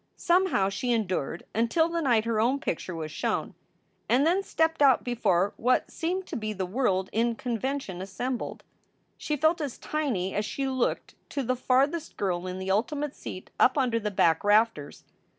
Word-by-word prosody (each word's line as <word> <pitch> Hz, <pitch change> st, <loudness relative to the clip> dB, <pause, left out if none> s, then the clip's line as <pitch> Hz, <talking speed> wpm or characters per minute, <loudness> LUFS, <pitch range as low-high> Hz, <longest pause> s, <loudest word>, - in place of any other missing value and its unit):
Somehow 345 Hz, -, +2 dB
she 245 Hz, +5 st, -2 dB
endured 185 Hz, -9 st, -1 dB
until 235 Hz, -, +2 dB
the 335 Hz, 0 st, -2 dB
night 235 Hz, -7 st, +2 dB
her 230 Hz, -2 st, 0 dB
own 250 Hz, +5 st, +2 dB
picture 180 Hz, -5 st, -3 dB
was 155 Hz, -1 st, -5 dB
shown, -, -, -2 dB, 0.6 s
and 260 Hz, +5 st, +4 dB
then 355 Hz, +4 st, +3 dB
stepped 320 Hz, -4 st, 0 dB
out 270 Hz, -3 st, +5 dB
before 205 Hz, -6 st, +1 dB
what 250 Hz, +3 st, +1 dB
seemed 360 Hz, +3 st, -2 dB
to 340 Hz, -, -7 dB
be 215 Hz, -3 st, -3 dB
the 190 Hz, -2 st, -3 dB
world 190 Hz, -2 st, 0 dB
in 230 Hz, +1 st, +1 dB
convention 245 Hz, -5 st, -3 dB
assembled. 235 Hz, +7 st, -4 dB, 0.5 s
She 300 Hz, -, -3 dB
felt 315 Hz, +3 st, +2 dB
as 285 Hz, -5 st, -4 dB
tiny 250 Hz, -12 st, -2 dB
as 210 Hz, -, 0 dB
she 270 Hz, +5 st, -3 dB
looked 260 Hz, -2 st, -1 dB, 0.2 s
to 280 Hz, -, -2 dB
the 255 Hz, +1 st, 0 dB
farthest 270 Hz, +6 st, +1 dB
girl 185 Hz, -2 st, -1 dB
in 185 Hz, 0 st, -4 dB
the 190 Hz, 0 st, -2 dB
ultimate 285 Hz, +8 st, 0 dB
seat 185 Hz, -, -8 dB
up 255 Hz, -, +5 dB
under 245 Hz, -4 st, +2 dB
the 210 Hz, -1 st, -2 dB
back 165 Hz, -5 st, +2 dB
rafters. 205 Hz, -8 st, +2 dB
240 Hz, 175 wpm, -27 LUFS, 195-280 Hz, 0.6 s, out